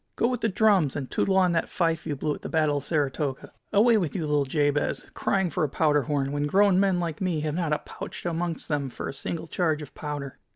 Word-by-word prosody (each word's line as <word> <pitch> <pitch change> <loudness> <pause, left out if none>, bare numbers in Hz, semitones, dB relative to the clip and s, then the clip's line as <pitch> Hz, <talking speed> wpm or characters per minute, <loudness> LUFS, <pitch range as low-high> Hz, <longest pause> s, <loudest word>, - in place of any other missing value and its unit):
Go 235 - +2
with 250 -2 -2
the 225 - +2
drums, 195 - +3
and 135 -3 -4
tootle 190 -1 +1
on 185 -2 +4
that 165 -1 0
fife 165 -2 0
you 150 - -1
blew 150 +2 -1
at - - -9
the - - -6
Battle 155 -3 +2
of 140 - -4
Saratoga. 145 -2 -2 0.2
Away 220 +2 +5
with 170 -6 -2
you, 170 -5 -1
little 150 -1 +1
Jabez, 145 +1 0
crying 190 -3 0
for 175 - 0
a 150 - +1
powder 150 0 +2
horn, 140 -2 -1
when 145 0 -1
grown 195 +3 +4
men 195 -2 +3
like 165 -2 -3
me 175 -5 0
have 150 -1 -2
not 165 -2 -1
a 150 - +3
pouch - - -9
amongst 170 -1 -2
them 145 -3 -1
for - - -6
a - - -4
single 165 +4 -4
charge 160 -3 0
of 145 - -12
powder!" 145 -3 -6
155 Hz, 245 wpm, -26 LUFS, 145-180 Hz, 0.2 s, Away